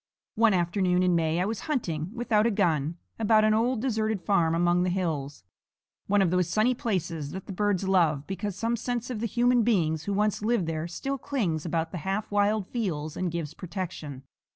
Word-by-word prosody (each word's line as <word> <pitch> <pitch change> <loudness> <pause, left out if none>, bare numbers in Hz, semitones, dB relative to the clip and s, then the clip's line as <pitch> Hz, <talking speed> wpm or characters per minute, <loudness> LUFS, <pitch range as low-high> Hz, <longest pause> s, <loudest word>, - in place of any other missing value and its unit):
One 220 -2 +4
afternoon 180 +1 +1
in 180 -1 +3
May 165 0 +1
I 180 - +1
was 215 0 -2
hunting, 170 - -1
without 230 -2 +1
a - - +3
gun, 170 -6 0 0.2
about 220 0 +4
an 215 - +4
old 230 +1 +1
deserted 220 -4 0
farm 165 -4 +2
among 175 +1 +3
the 180 - +1
hills 155 - -2 0.6
one 205 0 +4
of 175 - +1
those 180 -2 +1
sunny 220 +6 +3
places 175 - -2
that 190 0 -6
the 195 - -6
birds 200 -1 0
love, 160 -7 +2
because 195 +1 -4
some 230 +4 0
sense 245 +1 -3
of 230 - -3
the 230 - -1
human 245 +2 +3
beings 165 -9 +1
who 205 - -1
once 210 +1 +1
lived 220 -3 +1
there 160 0 -3
still 270 +10 -4
clings 180 - -2
about 165 0 -1
the 180 - -4
half 195 +6 -3
wild 205 0 +2
fields 160 -10 -3
and 185 -1 -1
gives 160 -3 -4
protection. 170 -7 -6
190 Hz, 200 wpm, -27 LUFS, 165-220 Hz, 0.6 s, One